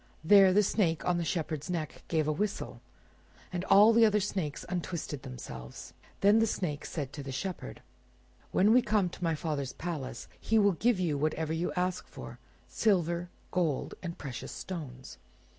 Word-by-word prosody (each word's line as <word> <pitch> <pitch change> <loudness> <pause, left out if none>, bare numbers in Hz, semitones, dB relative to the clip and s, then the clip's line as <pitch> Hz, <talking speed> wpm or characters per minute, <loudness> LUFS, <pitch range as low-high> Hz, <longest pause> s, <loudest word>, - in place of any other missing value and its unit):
There 195 +2 +7
the 205 +3 +4
Snake 180 -5 +1
on 175 -1 +2
the - - -1
Shepherd's 155 -2 -3
neck 165 -4 -3
gave 155 -2 +1
a - - +2
whistle, 200 +7 -3 0.7
and 180 0 -2
all 210 +3 +7
the 230 0 +6
other 210 -1 +5
snakes 185 -7 -3
untwisted 175 -5 -4
themselves. 65 - -9 0.3
Then 205 +3 +6
the 225 - +3
Snake 155 -8 -3
said 140 -4 -4
to 145 - -6
the 135 -1 -6
Shepherd— 170 - -5 0.7
"When 205 +4 +4
we 250 - +6
come 210 -5 +1
to 180 - -9
my 165 -2 +1
father's 145 -4 -3
palace 160 -6 -5
he 225 - +1
will 200 -2 +5
give 220 +3 +1
you 160 -6 0
whatever 155 +1 -1
you 165 +2 -1
ask 180 0 -1
for: - - -10 0.3
silver, 175 -4 +1 0.2
gold, 165 -7 0
and 170 -2 -5
precious 135 -4 -6
stones. 135 -8 -7
175 Hz, 170 wpm, -30 LUFS, 150-195 Hz, 0.7 s, There